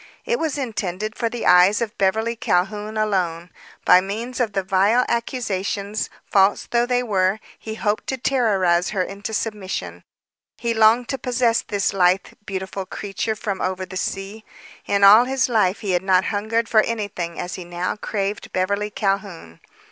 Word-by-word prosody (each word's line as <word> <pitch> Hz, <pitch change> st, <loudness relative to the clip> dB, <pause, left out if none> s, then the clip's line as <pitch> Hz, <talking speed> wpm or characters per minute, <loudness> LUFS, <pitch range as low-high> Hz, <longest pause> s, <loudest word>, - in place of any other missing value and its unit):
It 475 Hz, 0 st, 0 dB
was 310 Hz, -3 st, -1 dB
intended 215 Hz, -4 st, -3 dB
for 230 Hz, -2 st, -1 dB
the 240 Hz, 0 st, -5 dB
eyes 180 Hz, +3 st, +6 dB
of 230 Hz, -3 st, -3 dB
Beverly 220 Hz, +4 st, +1 dB
Calhoun 210 Hz, 0 st, -1 dB
alone. 180 Hz, -5 st, -1 dB, 0.3 s
By 180 Hz, -, +7 dB
means 225 Hz, +7 st, -5 dB
of 230 Hz, -5 st, 0 dB
the 195 Hz, -1 st, 0 dB
vile 200 Hz, +6 st, +3 dB
accusations, 210 Hz, -4 st, -2 dB, 0.2 s
false 195 Hz, 0 st, +3 dB
though 240 Hz, 0 st, +2 dB
they 250 Hz, 0 st, +1 dB
were, 195 Hz, -2 st, +1 dB, 0.2 s
he 220 Hz, -1 st, -6 dB
hoped 210 Hz, -1 st, -1 dB
to 265 Hz, -, -2 dB
terrorize 195 Hz, -10 st, +2 dB
her 195 Hz, -3 st, 0 dB
into 200 Hz, +3 st, -6 dB
submission. 210 Hz, -3 st, -4 dB, 0.5 s
He 235 Hz, -1 st, -1 dB
longed 225 Hz, +2 st, +4 dB
to 270 Hz, -, -2 dB
possess 240 Hz, -2 st, +1 dB
this 200 Hz, -1 st, -1 dB
lithe, 185 Hz, 0 st, +3 dB, 0.2 s
beautiful 190 Hz, 0 st, -4 dB
creature 210 Hz, +2 st, -3 dB
from 200 Hz, -3 st, -4 dB
over 185 Hz, 0 st, -2 dB
the 185 Hz, +1 st, -10 dB
sea. 195 Hz, +3 st, -4 dB, 0.4 s
In 200 Hz, 0 st, +1 dB
all 210 Hz, +5 st, +9 dB
his 265 Hz, 0 st, +1 dB
life 215 Hz, -6 st, +1 dB
he 200 Hz, -, -2 dB
had 180 Hz, -1 st, +2 dB
not 190 Hz, -1 st, +3 dB
hungered 225 Hz, +3 st, 0 dB
for 220 Hz, -, +5 dB
anything 205 Hz, -7 st, -4 dB
as 180 Hz, -, -4 dB
he 185 Hz, -, -6 dB
now 175 Hz, +1 st, -3 dB
craved 205 Hz, -1 st, -3 dB
Beverly 200 Hz, +3 st, -1 dB
Calhoun. 195 Hz, -, -3 dB
205 Hz, 165 wpm, -22 LUFS, 190-225 Hz, 0.5 s, all